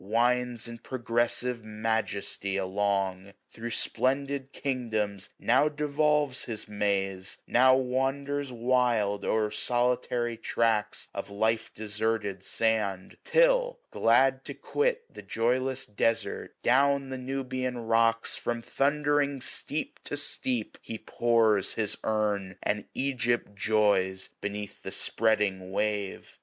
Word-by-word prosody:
Winds 120 +3 +1
in 115 0 -8
progressive 120 -1 -1
majesty 110 -2 -2
along: 95 0 0
815 100 - -17
Thro' 115 +1 -6
spltodid 135 +3 0
kingdoms 110 -7 -2
now 135 +6 +3
devolves 150 -2 +1
his 110 -3 -5
maze; 100 -2 -1
Now 130 +1 +5
wanders 135 +2 -1
wild 120 -4 +1
o'er 110 -1 +1
solitary 120 0 0
tracts 110 -2 0
Of - - -5
life 110 +2 0
deserted 105 -2 -2
sand; 105 -3 -1
till, - - +3
glad 130 +3 +3
to - - -6
quit 475 +1 0
The - - -9
joyless 130 +3 0
desart, 110 +2 -1
down 140 +2 +3
the 130 -1 -4
Nubian 130 -1 -3
rocks 115 0 +2
From 120 -1 -3
thundering 145 0 +1
steep 150 +4 -4
to 145 - -3
steep, 130 -5 -3
he 115 - -6
pours 110 -3 +2
his 105 -1 0
urn, 105 -3 0
Sao - - -26
And 105 0 -1
Egypt 120 -5 0
joys 100 -3 +1
beneath 105 0 -5
the - - -6
spreading 100 -4 +1
wave. 105 -1 -2
115 Hz, 115 wpm, -28 LUFS, 105-130 Hz, -, Now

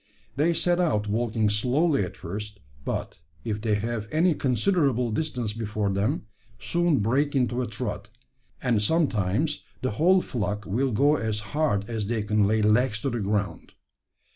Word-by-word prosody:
They 160 +5 +2
set 175 +2 +2
out 125 -13 +1
walking 110 0 0
slowly 125 - +2
at 90 - -6
first; 105 +4 -6 0.2
but, - - -4 0.2
if 105 -1 -3
they 110 -2 +1
have 110 +1 -3
any 165 +3 +3
considerable 130 - +1
distance 125 -5 -2
before 105 -2 -2
them, 105 +8 -1 0.3
soon 170 -3 +1
break 135 +8 +1
into 125 -1 +1
a 125 - -2
trot; 110 0 -5 0.5
and 115 -4 +2
sometimes 140 - +1 0.2
the 130 - 0
whole 180 - +3
flock 105 -3 -3
will 125 +7 0
go 145 +7 +3
as 110 -3 -2
hard 145 -10 +1
as 110 -3 -3
they 110 -1 -1
can 105 -1 +2
lay 110 +1 +2
legs 105 0 +3
to 135 - -1
the 120 - -2
ground. 100 0 -2
115 Hz, 160 wpm, -26 LUFS, 105-145 Hz, 0.5 s, any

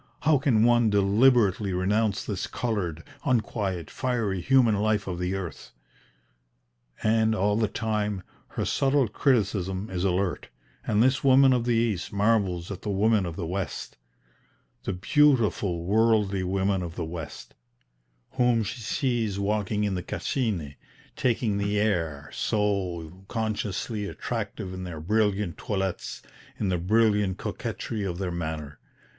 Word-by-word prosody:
how 150 -1 +4
can 120 -5 +3
one 120 -1 +4
deliberately 105 -1 +3
renounce 100 +3 +1
this 100 -4 -3
coloured, 95 -10 -2 0.2
unquiet, 100 - -1
fiery 115 -8 -1
human 120 +2 +4
life 105 -1 +1
of 90 -2 -4
the 90 +2 -1
earth?" 90 -4 -7 1.3
And, 110 0 +3
all 105 0 +2
the 110 0 +2
time, 105 -3 -2 0.2
her - - -3
subtle 135 -2 +2
criticism 100 -5 0
is 90 -1 -2
alert, 95 0 0 0.4
and 110 +1 +3
this 130 +1 +2
woman 135 0 +6
of 120 -2 0
the 120 -1 +2
East 115 -5 0
marvels 100 -4 +1
at 100 -1 -6
the 105 - -4
women 100 0 +2
of 85 - -5
the 90 -2 -4
West, 95 +3 -4 0.9
"the 100 - -1
beautiful 105 - +2
worldly 105 0 +2
women 95 +1 0
of 85 -2 -6
the 85 - -3
West," 80 -2 -8 0.8
whom 125 -3 +2
she 115 +4 -5
sees 115 -3 -1
walking 105 +1 0
in 100 -2 0
the 90 - -2
Cascine, 90 - -2 0.4
"taking 115 -4 0
the 100 +1 0
air 80 -9 -1
so 95 -4 -1
consciously 110 -1 -2
attractive 105 -4 -4
in 95 0 -6
their 85 -4 -6
brilliant 105 0 0
toilettes, 95 -3 -3 0.4
in 100 - 0
the 90 -2 0
brilliant 105 0 +2
coquetry 110 -3 -4
of 90 -3 -3
their 95 -1 -2
manner!" 80 -4 -5
105 Hz, 140 wpm, -26 LUFS, 95-110 Hz, 1.3 s, woman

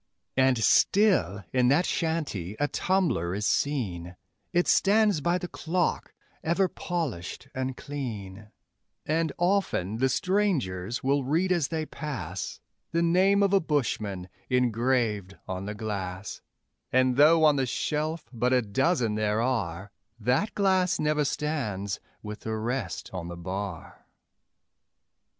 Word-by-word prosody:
And 130 -1 +4
still 110 - +3
in 125 -1 +3
that 145 +8 +4
shanty 150 - -2
a 145 - +2
tumbler 155 - 0
is 105 +1 -2
seen, 95 -14 -1 0.4
It 175 0 +2
stands 205 -4 +4
by 175 +4 +2
the 180 0 -5
clock, 175 +1 -1 0.3
ever 170 +4 +2
polished 155 - -4
and 130 0 -3
clean; 110 -8 -6 0.6
And 160 0 +1
often 175 - +1
the 130 +1 +3
strangers 130 - 0
will 140 +1 +2
read 165 +8 +1
as 170 -6 +2
they 160 -1 -2
pass 105 - -5 0.3
The 170 +1 +1
name 190 +4 +4
of 200 0 +2
a 195 - +6
bushman 110 - -1 0.2
engraved 120 -5 +1
on 95 +1 -4
the 105 - -4
glass; 100 -3 -5 0.5
And 130 0 +3
though 160 +4 +6
on 150 -2 +5
the 130 -1 +1
shelf 155 +3 -2
but 125 +2 +1
a 125 -1 +3
dozen 120 - +1
there 105 0 0
are, 100 -6 -1 0.3
That 125 - +1
glass 190 -2 +2
never 150 0 +2
stands 120 -11 -2 0.2
with 105 0 -6
the 110 0 -3
rest 120 +5 -3
on 90 -2 -4
the 85 0 -7
bar. 95 0 -6
130 Hz, 130 wpm, -27 LUFS, 105-165 Hz, 0.6 s, a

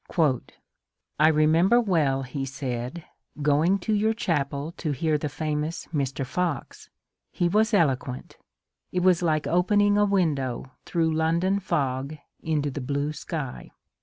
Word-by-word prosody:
^^ 150 -8 +2 0.8
I 155 - +6
remember 160 +8 +4
well," 155 - +1
he 135 +2 -4
said, 135 +2 -5 0.4
going 155 +6 +3
to 220 - +1
your 215 +2 +2
chapel 145 -6 -1
to 155 -3 -2
hear 155 +3 0
the 150 - -3
famous 155 +2 -3
Mr. 135 -2 -1
Fox. 160 +1 -3 0.4
He 175 - 0
was 215 +5 +2
eloquent; 135 - 0 0.5
it 180 - 0
was 185 -2 +4
like 155 -3 +1
opening 205 +4 +3
a 205 - +5
window 145 -10 0 0.2
through 165 -2 +1
London 170 +5 +1
fog 140 -4 -2 0.2
into 150 -3 -1
the 140 - -5
blue 140 +3 -2
sky. 150 -5 -6
155 Hz, 135 wpm, -26 LUFS, 140-180 Hz, 0.8 s, I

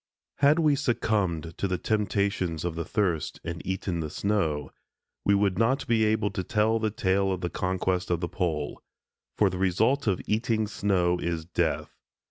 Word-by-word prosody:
Had 145 +3 +5
we 155 -3 +4
succumbed 100 - 0
to 100 - +1
the 90 -1 -1
temptations 100 -5 0
of 85 - -1
the 85 +1 -3
thirst 95 -8 -1
and 85 +1 -5
eaten 95 -2 -2
the 80 -2 -3
snow, 80 -8 -1 0.5
we 100 - +4
would 100 -1 +1
not 130 +4 +2
be 115 -2 +3
able 110 -1 +1
to 95 - -3
tell 110 +3 +2
the 110 -1 0
tale 95 -2 +1
of 90 -1 -2
the 90 - -2
conquest 95 0 -1
of 85 -2 +1
the 85 - -2
Pole; 80 -5 -2 0.6
for 105 - +4
the 90 -1 -3
result 110 +9 +2
of 95 -3 +2
eating 110 0 +1
snow 95 -4 +1
is 85 -2 -2
death. 90 - -1
95 Hz, 175 wpm, -27 LUFS, 85-110 Hz, 0.6 s, Had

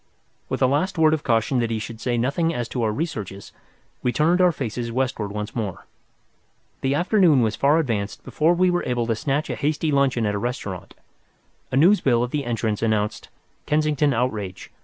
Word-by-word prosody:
With - - -1
a - - +7
last 150 +9 0
word 155 -1 +4
of 155 - 0
caution 120 +1 +1
that 115 -1 0
he 115 - -1
should 110 +1 -7
say 120 -2 0
nothing 140 +8 +1
as 120 -1 -2
to 125 - -3
our 110 -2 +1
researches, 105 - -5 0.5
we 125 - +1
turned 160 +9 +2
our 180 -1 +5
faces 120 -5 -4
westward 120 -5 -2
once 105 +1 -5
more. 105 -6 -4 1.0
The 135 +1 +1
afternoon 175 - +4
was 110 -1 0
far 140 +6 +3
advanced 110 -10 -2
before 165 +3 +1
we 180 +1 +3
were 175 - 0
able 120 -2 0
to 115 -1 0
snatch 145 +6 -1
a - - -2
hasty 150 +1 -1
luncheon 135 -5 +2
at 105 - 0
a 100 - -2
restaurant. 100 -6 -5 0.8
A 130 - +1
news 185 +8 +5
bill 120 -3 +2
at 125 - -3
the 145 -2 -2
entrance 110 -3 -1
announced 110 -2 -1 0.4
"Kensington 150 -1 +2
Outrage. 110 -7 -3
125 Hz, 195 wpm, -23 LUFS, 110-150 Hz, 1.0 s, a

